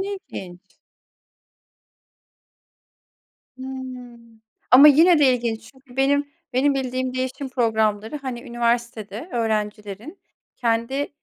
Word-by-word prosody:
ne 400 +1 -3
ilginç. 180 - -10 3.0
Hımm. 250 -3 -9 0.3
Ama 275 +4 +10
yine 325 +3 +6
de 270 -3 +5
ilginç 230 -2 -4
çünkü 265 -1 -19
benim 285 +2 +1 0.2
benim 275 +3 +2
bildiğim 255 -1 -2
değişim 260 +2 -3
programları, 220 -1 0
hani, 255 -4 -6
üniversitede 235 - -2
öğrencilerin 215 - -3 0.4
kendi, 235 +4 -1
250 Hz, 90 wpm, -23 LUFS, 225-270 Hz, 3.0 s, Ama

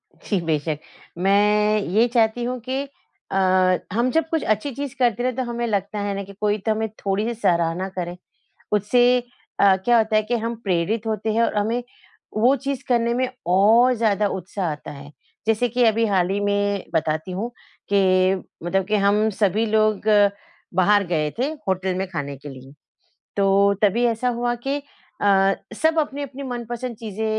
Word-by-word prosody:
जी, 200 - -2
बेशक। 155 -1 -1 0.5
मैं 210 +2 +3
ये 230 +3 +4
चाहती 230 0 +2
हूँ 250 +1 -3
कि 265 +1 -1 0.5
अ, - - -2 0.6
हम 240 +3 +1
जब 325 +1 +1
कुछ 320 -1 0
अच्छी 215 +7 0
चीज़ 280 +1 -6
करते 240 -1 +2
हैं 255 -1 0
तो 260 - -1
हमें 240 0 -3
लगता 205 -1 -2
है 205 0 -2
ना 200 - -4
कि 200 +1 -12
कोई 210 0 +1
तो 220 +2 -2
हमें 220 +1 -1
थोड़ी-सी 205 +4 -1
सराहना 170 0 +1
करे। 175 0 -3 0.6
उससे 210 +4 +3 0.6
अ, 195 -1 +6
क्या 235 +6 +2
होता 220 -1 +2
है 215 - +4
कि 240 +3 -1
हम 230 +1 -2
प्रेरित 200 +4 0
होते 220 0 -1
हैं 230 +2 +2
और 230 - 0
हमें 225 +4 0 0.5
वो 240 +5 +4
चीज़ 275 0 -4
करने 235 -1 +2
में 255 +1 0 0.2
और 225 +7 +5
ज़्यादा 215 -3 +1
उत्साह 185 -1 -3
आता 150 -1 -7
है। 140 0 -11 0.4
जैसे 225 +2 +2
कि 245 +1 +1
अभी 225 0 +3
हाल 185 -3 +1
ही 200 +1 0
में 205 -1 0
बताती 160 +2 -1
हूँ 210 +6 -3 0.4
कि 185 -1 +4 0.3
मतलब 190 +2 0
कि 215 +1 +1
हम 210 +2 +3
सभी 210 +1 +1
लोग 215 -1 +2 0.8
बाहर 200 +2 +4
गए 155 -3 0
थे, 250 - +1 0.2
होटल 190 0 0
में 190 - -1
खाने 145 -6 -5
के 140 +2 -11
लिए 135 0 -11 0.6
तो 200 0 +3
तभी 215 +4 +3
ऐसा 235 +1 0
हुआ 240 0 -1
कि 280 +1 -1 0.4
अ, 195 -1 +4 0.2
सब 320 +4 +2
अपनी-अपनी 280 -2 -3
मनपसंद 240 -2 -5
चीज़ें 220 -1 -5
210 Hz, 175 wpm, -22 LUFS, 195-240 Hz, 0.8 s, अ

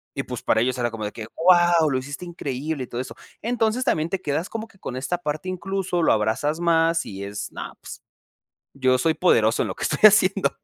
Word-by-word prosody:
Y - - -2
pues, - - -6
para 110 - +2
ellos 130 +1 0
era 120 -1 -1
como 110 -1 -5
de 105 - -4
que: 110 -2 -8
"¡Wao, 175 -2 +4
lo 130 - 0
hiciste 145 +6 -6
increíble!", 145 -3 -4
y - - -8
todo 120 - -5
eso. 130 - -8 0.3
Entonces 235 +1 0
también 160 -7 0
te 195 -1 -2
quedas 150 +5 -2
como 225 0 -5
que 195 - -24
con 125 - -6
esta 140 +7 -2
parte, 155 +1 -4
incluso 190 -1 -2
lo - - +4
abrazas 110 +9 0
más 165 -1 +2
y 100 0 -7
es: 100 0 -6
"No, - - -7
pues, - - -10 0.7
yo 130 -1 +2
soy 160 +5 +2
poderoso 115 -11 +3
en - - 0
lo - - -5
que - - -6
estoy 150 - -1
haciendo". 195 -2 +3
160 Hz, 225 wpm, -23 LUFS, 130-180 Hz, 0.7 s, Wao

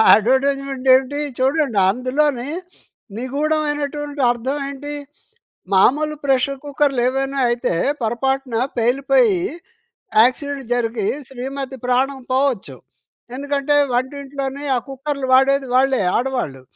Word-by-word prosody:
ఆ - - +7
యడ్వర్టైజ్‌మెంట్ 270 +3 0
ఏంటి 265 +2 +1 0.2
చూడండి 265 -3 +1
అందులోనే 255 +3 0 0.7
నిగూఢమైనటువంటి 295 +2 -2
అర్థం 250 +4 -2
ఏంటి 285 +1 -7 0.8
మామూలు 300 +10 +3
ప్రెషర్ 270 0 +1
కుక్కర్లేవైనా 270 -1 0
అయితే 240 -6 0 0.3
పొరపాటున 260 +2 -1 0.2
పేలిపోయి 275 - +3 0.8
యాక్సిడెంట్ 275 +3 0
జరిగి 230 -3 -1 0.2
శ్రీమతి 265 +1 -5
ప్రాణం 265 +2 +1
పోవచ్చు. 255 - 0 0.6
ఎందుకంటే 285 +1 -1 0.2
వంటింట్లోనే 275 +2 -3
ఆ - - +2
కుక్కర్లు 275 0 -4
వాడేది 270 +1 +4
వాళ్ళే 265 0 +3 0.2
ఆడవాళ్ళు. 245 - -2
270 Hz, 95 wpm, -20 LUFS, 255-285 Hz, 0.8 s, ఆ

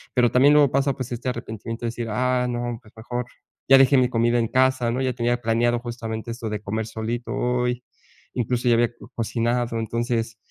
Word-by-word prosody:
pero 120 -2 +4
también 140 +3 +5
luego 145 -3 +5
pasa 140 +1 +2
pues 130 -1 -6
este 120 +2 -3
arrepentimiento 115 -1 -5
de - - 0
decir: 115 0 -5
"Ah, 125 +3 +1
no, 120 -1 -3
pues 110 -3 -19
mejor, 120 +2 -4 0.4
ya 135 - +9
dejé 135 +1 +5
mi 125 -1 +3
comida 120 0 +2
en 115 - +1
casa, 130 0 +2
¿no?, 125 +2 -1
ya 130 -1 0
tenía 120 0 0
planeado 120 +1 +2
justamente 115 -1 -5
esto 115 -1 -5
de 105 -1 -4
comer 110 +2 -3
solito 115 +2 -4
hoy, 125 -1 0 0.5
incluso 125 +1 -1
ya 120 - +5
había 120 0 +3 0.2
cocinado, 120 +1 -1
entonces, 115 0 -2
120 Hz, 195 wpm, -23 LUFS, 115-125 Hz, 0.5 s, ya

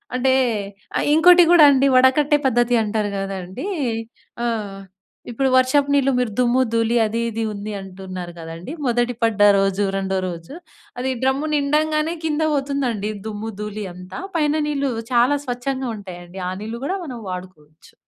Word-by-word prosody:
అంటే 260 +1 +2 0.8
ఇంకోటి 355 +2 +7
కూడా 345 -3 +8
అండి 275 0 +4
వడకట్టే 280 +3 +4
పద్ధతి 240 0 +2
అంటారు 210 -1 -1
కదండీ. 195 - -5 0.8
ఆ! - - 0 0.9
ఇప్పుడు 265 +3 0
వర్షపు 270 +2 +3
నీళ్లు 275 -1 +3
మీరు 245 -4 -1
దుమ్ము, 250 +1 +3
ధూళి 230 +1 +2
అది 230 +2 -2
ఇది 225 0 -3
ఉంది 205 +1 -6
అంటున్నారు 185 -2 -8
కదండీ. 165 - -8
మొదటి 240 0 +1
పడ్డ 220 -2 +1 0.2
రోజు, 195 +1 +1
రెండో 190 0 -1
రోజు. 170 +4 -7 0.5
అది 260 +1 -1
డ్రమ్ము 275 +4 +1
నిండగానే 305 +2 +1
కింద 315 0 0
పోతుందండి, 270 -7 -1 0.2
దుమ్ము 220 +1 -5
ధూళి 210 0 -5
అంతా 180 +1 -9 0.2
పైన 300 0 +1
నీళ్ళు 280 -2 -1 0.2
చాలా 245 +4 +4
స్వచ్ఛంగా 255 +1 -3
ఉంటాయండి 180 -1 -9
ఆ - - -3
నీళ్లు 225 +2 -6
కూడా 380 +5 -1
మనం 250 -5 -7
వాడుకోవచ్చు. 180 -4 -10
240 Hz, 145 wpm, -21 LUFS, 195-275 Hz, 0.9 s, కూడా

